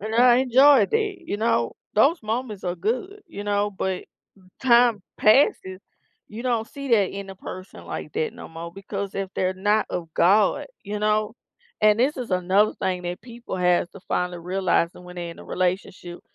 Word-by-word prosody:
And 215 +2 -4
I 240 +1 +6
enjoyed 260 -1 +5
it, 425 -4 0
you 205 - -3
know? 210 - +1 0.2
Those 280 +9 +3
moments 220 -2 -4
are 175 -1 -1
good, 255 - -3
you 205 - -8
know? 205 0 0
But, 190 -1 -3 0.6
time 235 -4 +4 0.2
passes, 215 -5 +3 0.5
you 220 +3 -8
don't 235 -3 0
see 280 +2 -8
that 210 -6 +3
in 200 0 -7
a 195 - -8
person 185 0 -10
like - - -6
that 460 0 -1
no - - -10
more 165 +1 -8
because 195 +1 -6
if 195 -1 -3
they're 185 0 0
not 210 +3 +1
of 170 -2 -4
God, 205 +10 +3 0.2
you 210 +1 -4
know? 215 +1 0 0.5
And- 215 0 +5
this 275 +5 +2
is 250 -4 -5
another 185 +3 +2
thing 185 -2 -2
that 175 +1 -5
people 235 -3 -8
have 180 -1 +2
to 195 - -13
finally 180 -1 -2
realize 180 -1 0
that - - -14
when 180 0 -12
they 170 -1 -5
in 170 - -12
a - - -11
relationship- 180 -1 -3
205 Hz, 185 wpm, -24 LUFS, 185-235 Hz, 0.6 s, I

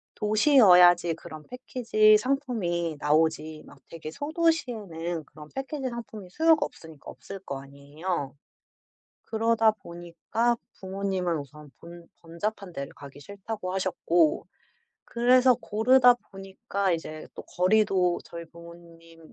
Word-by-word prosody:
도시여야지 195 - +5
그런 155 -1 -11
패키지 230 -4 +2
상품이 215 - -2
나오지 155 0 0
막 - - -15
되게 160 -2 -8
소도시에는 225 - -2
그런 150 +1 -14
패키지 270 0 -4
상품이 225 -5 -9
수요가 320 - +3
없으니까 160 -3 -12
없을 195 - -10
거 140 -7 -7
아니에요. 140 +2 -6 0.9
그러다 225 0 +2
보니까 175 +5 -3 0.2
부모님은 190 -3 -2
우선 145 +1 -12
번 170 0 -13
"번잡한 180 +4 -5
데를 140 -3 -6
가기 140 0 -13
싫다."고 200 +2 -7
하셨고 175 -3 +1 0.6
그래서 250 +2 +4
고르다 245 +4 +4 0.2
보니까 195 0 -3
이제 155 -2 -5
또 - - -8
거리도 185 -2 +1
저희 170 0 -9
부모님이 170 0 -15
185 Hz, 290 characters per minute, -26 LUFS, 165-225 Hz, 0.9 s, 도시여야지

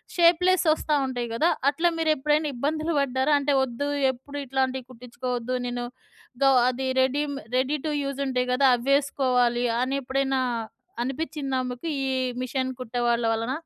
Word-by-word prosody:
Shapeless 350 +1 +4
వస్తా 310 -1 -1
ఉంటాయి 245 -2 -3
గదా! 320 +9 +2 0.2
అట్లా 340 +4 +1
మీరేప్పుడైనా 305 -1 +1
ఇబ్బందులు 310 +5 -1
పడ్డారా? 265 +2 +1
అంటే 280 0 +1
వద్దు 265 +3 -3 0.2
ఎప్పుడు 280 +3 -9
ఇట్లాంటివి 260 -1 -1
కుట్టించుకోవద్దు 250 0 -4
నేను 245 0 -3 0.6
గ - - +5 0.2
అది 260 +1 -3
రెడీ‌మే 280 +2 0 0.2
రెడీ 270 +4 +1
టు 300 - -1
యూజ్ 275 0 -4
ఉంటాయి 250 -1 -1
గదా! 275 +1 +4
అవేసుకోవాలి 250 -2 +2 0.2
అనేప్పుడైనా 270 0 0 0.6
అనిపించిందా 275 -1 -3
మీకు? 250 +7 -7 0.2
ఈ - - -1 0.3
మిషన్ 260 +1 -2
కుట్టే 245 0 -3
వాళ్ళ 235 0 +1
వలన? 230 +2 -3
265 Hz, 135 wpm, -25 LUFS, 250-290 Hz, 0.6 s, గ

